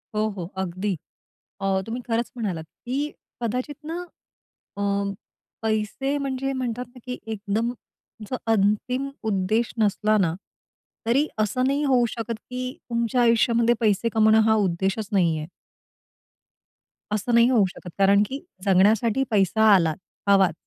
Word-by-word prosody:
हो, 215 +1 +2
हो 190 -4 -5
अगदी. 190 +2 -2 0.7
अ, 195 -1 +1
तुम्ही 235 +3 -4
खरंच 230 +1 -1
म्हणालात 190 -9 -3 0.2
की 280 +5 -1 0.3
कदाचित 250 +5 -2
ना 330 +3 -4 0.8
अ, - - -3 0.8
पैसे 220 +6 -1
म्हणजे 270 -1 -2
म्हणतात 250 -2 -3
ना - - -11
की 250 0 -4
एकदम 220 +2 -1 0.6
जो 255 - -1 0.2
अंतिम 225 +6 +1 0.2
उद्देश 215 +4 +1
नसला 215 0 +2
ना 175 -5 +2 0.7
तरी 275 +6 +3
असं 215 +4 +1
नाही 280 +2 +1
होऊ 255 -4 +4
शकत 230 0 -4 0.2
की 255 0 -3 0.2
तुमच्या 235 +1 +1
आयुष्यामध्ये 235 0 +4
पैसे 220 +1 +2
कमावणं 220 0 +5
हा 220 - +5
उद्देशच 195 +1 0
नाहीये. 165 -6 +2 1.7
असं 215 +3 -1
नाही 235 +1 +6
होऊ 225 -6 +4
शकत 180 - -9
कारण 200 +1 +5
की 275 - -4 0.3
जगण्यासाठी 215 +6 +4
पैसा 210 +2 +4
आलाच, 165 -4 +2 0.3
हवाच. 195 -4 +5
220 Hz, 130 wpm, -24 LUFS, 200-250 Hz, 1.7 s, नाही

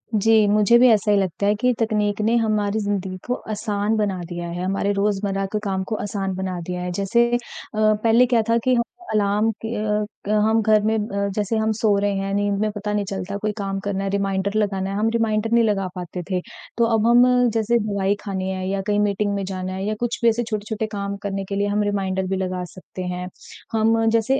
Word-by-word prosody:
जी। 220 +1 +4
मुझे 210 +3 +5
भी 255 - +7
ऐसा 210 -1 +3
ही 205 - +4
लगता 190 0 -1
है 205 - +3
कि 250 +4 +2
तकनीक 210 -2 0
ने 225 +2 +2
हमारी 215 -2 +1
ज़िंदगी 200 -3 -2
को 245 - +1 0.2
आसान 210 0 -1
बना 200 -3 0
दिया 175 -1 -5
है, 175 +1 -4
हमारे 195 +2 0
रोज़मर्रा 200 -1 0
के - - +1
काम 190 -2 -1
को - - +1
आसान 195 -2 -3
बना 185 -1 -3
दिया 180 +1 -4
है। 180 0 -3
जैसे 235 +5 +3
अ, 240 - +3 0.4
पहले 215 +3 +4
क्या 240 -2 +2
था 230 - +4
कि 255 - +3
हम 235 - +2 0.3
अलार्म 210 +1 +2
कि 225 - -4 0.6
क - - -3
अ, - - +2
हम 215 +1 +3
घर 215 0 +4
में 220 +1 +1
अ, 200 -2 -2
जैसे 210 +1 -1
हम 220 0 +1
सो 210 -2 +3
रहे 205 0 +1
हैं, 195 0 -2
नींद 205 0 0
में 215 +1 +1
पता 210 0 -4
नहीं 205 -1 0
चलता 195 0 -4
कोई 215 +1 -1
काम 195 -1 -2
करना 195 -1 -1
है, 195 - -1
रिमाइंडर 195 0 -1
लगाना 195 -2 -1
है, 195 - -3
हम 220 +2 +2
रिमाइंडर 225 -1 0
नहीं 235 0 +5
लगा 200 -3 +1
पाते 180 0 -5
थे। 185 -1 0 0.4
तो 235 - +4
अब 220 +1 +1
हम 245 +1 +5
जैसे 225 +1 +2
दवाई 200 -2 0
खानी 190 -2 -3
है 185 0 -3
या 195 0 -1
कहीं 205 0 +2
मीटिंग 205 0 +1
में 200 -1 -2
जाना 185 -1 -4
है 190 +1 -4
या 215 - 0
कुछ 240 -1 -2
भी 235 - +5
ऐसे 235 +1 0
छोटे-छोटे 215 0 -2
काम 200 -1 -3
करने 195 -1 -2
के 200 - -2
लिए 200 +1 +1
हम 205 +1 +1
रिमाइंडर 190 -2 -1
भी 190 - -1
लगा 185 -1 -2
सकते 185 0 -9
हैं। 180 0 -4 0.5
हम 225 0 +3
जैसे 230 +4 +2
205 Hz, 230 wpm, -22 LUFS, 195-220 Hz, 0.6 s, भी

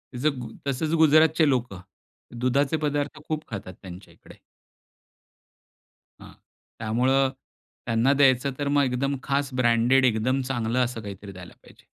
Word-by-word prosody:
तस 125 - -6 0.2
गु 120 - -6 0.2
तसंच 145 +4 -1
गुजरातचे 155 +1 +5
लोकं 120 -8 -2 0.6
दुधाचे 135 +4 +1
पदार्थ 145 0 -3
खूप 155 -1 -3
खातात 100 -4 -7
त्यांच्या 90 0 -11
इकडे. - - -18 1.8
हां. - - -13 0.5
त्यामुळे 130 +5 +2 0.6
त्यांना 120 +3 +2
द्यायचं 135 -1 +3
तर 145 - -2
मग 145 0 +3
एकदम 135 +2 -1
खास 140 0 -1
ब्रँडेड 120 +2 +3
एकदम 125 +3 +1
चांगलं 125 -2 -2
असं 120 -2 -6
काहीतरी 100 -1 -9
द्यायला 90 -2 -12
पाहिजे. - - -20
130 Hz, 130 wpm, -25 LUFS, 115-140 Hz, 1.8 s, गुजरातचे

